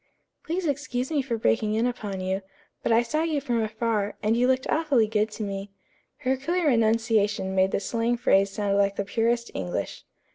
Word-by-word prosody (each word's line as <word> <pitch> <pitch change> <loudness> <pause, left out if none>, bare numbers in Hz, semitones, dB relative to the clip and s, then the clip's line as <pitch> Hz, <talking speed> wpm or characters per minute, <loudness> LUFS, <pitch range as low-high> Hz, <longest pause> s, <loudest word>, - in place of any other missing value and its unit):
"Please 345 +3 -2
excuse 280 -2 -2
me 295 -3 +2
for 245 -3 -2
breaking 215 -1 +1
in 225 +2 +2
upon 210 -6 -3
you, 190 +1 -1 0.4
but - - -1
I 230 +1 +5
saw 305 +7 -1
you 320 -3 0
from 240 -4 -1
afar, 220 -1 -1
and 215 +2 +2
you 245 +1 +3
looked 260 0 +1
awfully 290 -8 +2
good 215 0 0
to 215 - -4
me." 200 0 -4 0.6
Her 260 +1 +3
clear 330 +3 +1
enunciation 220 -4 +2
made 190 0 +3
the - - 0
slang 230 +3 -1
phrase 195 -4 +3
sound 200 0 0
like 200 0 +2
the 200 - -2
purest 235 +3 0
English. 90 -2 -4
230 Hz, 190 wpm, -26 LUFS, 205-255 Hz, 0.6 s, I